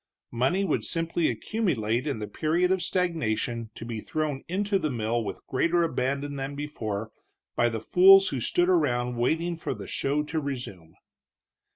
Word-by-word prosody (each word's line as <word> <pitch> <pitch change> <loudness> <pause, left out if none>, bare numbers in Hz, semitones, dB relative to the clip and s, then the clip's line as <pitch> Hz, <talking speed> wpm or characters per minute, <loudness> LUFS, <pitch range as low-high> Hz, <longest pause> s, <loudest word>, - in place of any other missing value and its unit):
Money 130 +12 +1
would - - 0
simply 165 -1 0
accumulate 130 - -1
in 140 - -1
the 105 - -4
period 165 - +1
of 190 -1 +1
stagnation 120 - -1
to - - -8
be 115 -2 -4
thrown 150 +3 -3
into 200 +2 0
the 155 - -1
mill 115 -1 -1
with 105 - -6
greater 170 +6 +1
abandon 140 -1 -1
than 135 +1 -4
before 110 -8 -4 0.4
by 120 - +3
the 115 -1 -3
fools 195 - +7
who 135 -4 -3
stood 175 +9 +1
around 125 -9 +1
waiting 160 +8 0
for 160 -5 -4
the 100 -3 -8
show 145 +8 -1
to 160 +2 -2
resume. 120 - -6
145 Hz, 165 wpm, -27 LUFS, 120-170 Hz, 0.4 s, fools